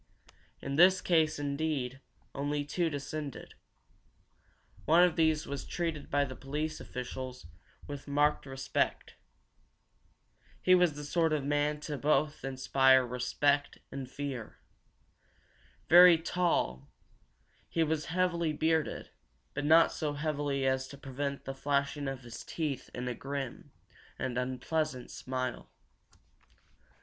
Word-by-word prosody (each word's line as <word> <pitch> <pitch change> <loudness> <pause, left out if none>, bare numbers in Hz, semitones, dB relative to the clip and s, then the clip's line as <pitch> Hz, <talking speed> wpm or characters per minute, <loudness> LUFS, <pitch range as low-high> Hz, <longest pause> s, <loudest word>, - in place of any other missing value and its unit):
In 140 0 -3
this 185 +3 +7
case, 160 -3 +2
indeed, 140 -3 -2 0.3
only 145 +1 -2
two 170 +3 0
descended. 145 -1 -6 1.3
One 165 +4 +6
of 180 -2 +3
these 160 -2 +2
was 140 -1 -5
treated 165 -4 -3
by 145 0 +2
the 130 -1 -7
police 150 +4 -4
officials 125 -1 -6 0.4
with 145 -1 -8
marked 145 0 +1
respect. 135 0 -2 1.5
He 185 - +4
was 180 -3 +5
the 150 - -6
sort 160 +1 +1
of 150 -2 0
man 145 +1 0
to 150 - -5 0.5
inspire 130 0 +4
both 120 - -10
respect 140 +3 +1
and 135 -2 -6
fear. 135 -5 -6 1.3
Very 175 0 +9
tall, 160 - -1 0.8
he 165 - +1
was 155 -1 -1
heavily 170 -2 0
bearded, 160 +1 0 0.4
but 145 +1 -3
not 160 +2 +6
so 150 -3 -2
heavily 145 -2 -1
as 130 0 +1
to 140 - -11
prevent 140 +1 -4
the 135 - -4
flashing 140 +1 -1
of 135 -1 -4
his 120 -2 -9
teeth 150 -6 -4
in 125 0 -4
a 125 - -1
grim 135 0 -6 0.5
and 125 - -3
unpleasant 130 +2 -2
smile. 130 0 -4
145 Hz, 120 wpm, -31 LUFS, 135-160 Hz, 1.5 s, Very